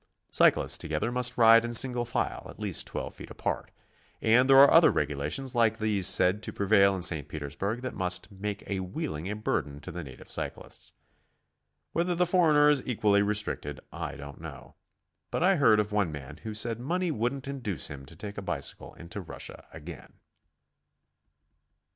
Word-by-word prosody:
Cyclists - - +3
together 80 +10 -2
must 125 0 +1
ride 115 0 +7
in 120 0 -3
single 120 0 +3
file, 120 - -3
at - - -12
least - - -1
12 - - -5
feet - - -11
apart. - - -4 0.5
And 125 +4 +3
there 135 - +7
are 140 +1 +8
other 165 0 +7
regulations 75 - -2
like 115 -2 +2
these 105 -4 +1
said 90 +4 +3
to - - -4
prevail 100 -1 +3
in 90 - -4
St. 80 -6 +4
Petersburg 80 - -4
that 130 - -4
must 90 0 -1
make 100 +1 -6
wheeling 95 - -4
a 105 - -3
burden 75 -9 -2
to - - -8
the 90 - -6
native 65 -3 -12
cyclist. - - -6 1.0
Whether 175 +1 0
the 180 +1 +2
foreigner 160 -5 +4
is 145 -3 +4
equally 105 -4 +2
restricted, 100 -8 -2
I - - -5
don't 70 0 -10
know, - - -10 0.6
but - - -1
I 190 0 +4
heard 115 -7 +5
of 105 0 -1
one 105 -5 0
man 70 -3 -9
who 110 -1 -7
said 115 +1 0
money 175 +7 -1
wouldnT, 130 +2 -2
induce 125 - -4
him 70 -2 -9
to 80 - -12
take 100 +3 -7
a - - -6
bicycle 95 - -5
into 85 +4 -8
Russia 85 - -9
again. - - -11
105 Hz, 170 wpm, -28 LUFS, 90-125 Hz, 1.0 s, are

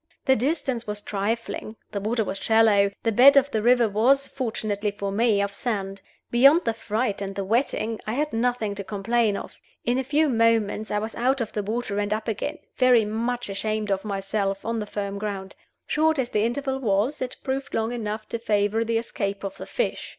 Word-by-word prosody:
The 265 - +5
distance 265 -2 -1
was 210 0 -3
trifling, 215 +2 -3 0.2
the 200 - -2
water 220 +2 0
was 195 -1 -4
shallow, 220 -3 +4
the 225 - +2
bed 270 +6 +7
of 275 +1 +4
the 220 - 0
river 240 0 +4
was 250 +7 +3
(fortunately 220 -6 -2
for 200 -1 -4
me) 210 -1 +2
of 200 0 -3
sand. 195 -4 -3 0.3
Beyond 275 +8 +6
the 230 - +1
fright 220 -1 -2
and 195 0 -4
the 200 - -2
wetting 225 +1 0
I 215 - -1
had 295 +2 -1
nothing 230 -2 0
to 200 0 -6
complain 210 +2 0
of. - - -8 0.3
In 245 +2 +2
a - - 0
few 300 +4 +2
moments 225 -3 +2
I 210 - 0
was 220 +2 -3
out 260 +3 +1
of 230 -3 -3
the 210 - -1
water 210 0 -2
and 205 0 -1
up 215 +1 -6
again, 220 -3 -2 0.2
very 250 -4 +5
much 235 +3 -2
ashamed 210 +1 -2
of 195 0 0
myself, 195 -1 -2
on 230 0 -1
the 210 - -4
firm 200 -1 -4
ground. 195 -2 -4 0.3
Short 315 +1 +2
as 255 -2 -1
the 210 +1 +2
interval 265 +3 -2
was, 225 +5 0
it 255 -1 -3
proved 270 0 -3
long 225 +1 0
enough 215 -2 -4
to 230 - -3
favor 210 0 +1
the 230 0 0
escape 200 -3 -3
of 195 -1 -5
the - - -8
fish. - - -2
220 Hz, 205 wpm, -25 LUFS, 205-245 Hz, 0.3 s, bed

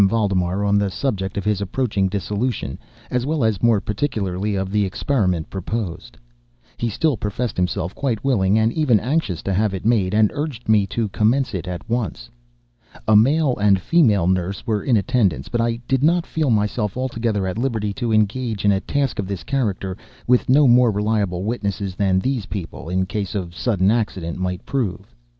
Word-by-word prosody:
Valdemar 100 -3 0
on 100 0 +3
the 100 -1 0
subject 95 -2 -2
of 100 - -2
his 105 -2 +1
approaching 100 -1 0
dissolution, 105 +5 -2 0.3
as 125 -1 0
well 155 -4 0
as, 110 -4 +1
more 115 -3 +4
particularly, 105 -4 -2
of 95 0 -2
the 105 0 +2
experiment 95 - 0
proposed. 95 -1 -5 0.6
He 120 - -1
still 150 +6 +1
professed 105 +3 -3
himself 90 0 -1
quite 120 -7 -2
willing 105 -7 +2
and 110 +1 +2
even 135 -9 +3
anxious 125 - -1
to 100 - -1
have 100 +1 +1
it 95 - -7
made, 105 -4 +2
and 110 -1 +4
urged 145 -6 -4
me 105 -2 +4
to 110 +3 -1
commence 120 +5 +1
it 95 -1 -4
at 90 +1 -6
once. 115 - -3 0.8
A 110 - +5
male 135 +5 +4
and 100 -2 +5
a - - -9
female 110 - +3
nurse 95 +1 -1
were 105 -3 0
in 120 -4 +3
attendance; 100 - 0
but 120 - 0
I 115 0 +1
did 135 -1 +1
not 170 +3 +3
feel 155 -3 -1
myself 105 -1 0
altogether 115 -6 -1
at 95 +4 -3
liberty 110 -5 -1
to 120 +1 -2
engage 110 0 0
in 100 - +5
a 95 - +2
task 140 -3 -1
of 100 - -2
this 100 -2 -4
character 100 -8 -2 0.3
with 125 0 +2
no 140 +2 +6
more 125 0 +6
reliable 105 -3 0
witnesses 100 -3 -2
than 95 -1 +1
these 120 -1 -1
people, 85 -4 -6
in 95 +1 0
case 100 +2 -4
of 85 -4 -4
sudden 100 -2 +1
accident, 95 -7 -2
might 90 -1 -3
prove. 120 -10 -3
105 Hz, 185 wpm, -21 LUFS, 95-120 Hz, 0.8 s, no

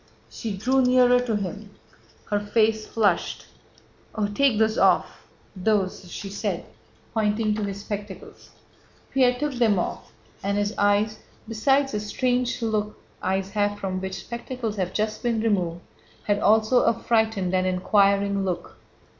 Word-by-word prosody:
She 215 -4 -5
drew 260 +6 +2
nearer 250 -1 +5
to 245 -3 -1
him. 205 +1 -4 0.6
Her 205 - +2
face 215 +1 +1
flushed. 205 -6 0 0.7
"Oh, 215 -2 0
take 220 +3 +2
those 220 +1 +2
off... - - +2 0.3
those..." 190 -2 -1
she 200 - -6
said, 195 - -3 0.5
pointing 215 -1 +1
to 210 0 -2
his 200 0 -4
spectacles. 205 -1 -8 0.6
Pierre 250 -2 +3
took 295 +1 -2
them 230 -5 +2
off, 175 - -4 0.3
and 200 +1 -1
his 205 +1 0
eyes, 205 +1 +2 0.3
besides 270 +5 +2
the 210 - -2
strange 245 +3 -1
look 215 -1 -1 0.2
eyes 190 +1 -1
have 205 0 0
from 190 -2 -3
which 190 0 -5
spectacles 235 -2 -5
have 185 -2 -1
just 215 +1 -2
been 235 -2 0
removed, 180 -6 0 0.4
had 205 -1 +1
also 220 +4 +4
a 230 - +2
frightened 220 -5 +1
and 185 0 +2
inquiring 200 +1 +2
look. 180 -2 -4
210 Hz, 145 wpm, -25 LUFS, 200-230 Hz, 0.7 s, nearer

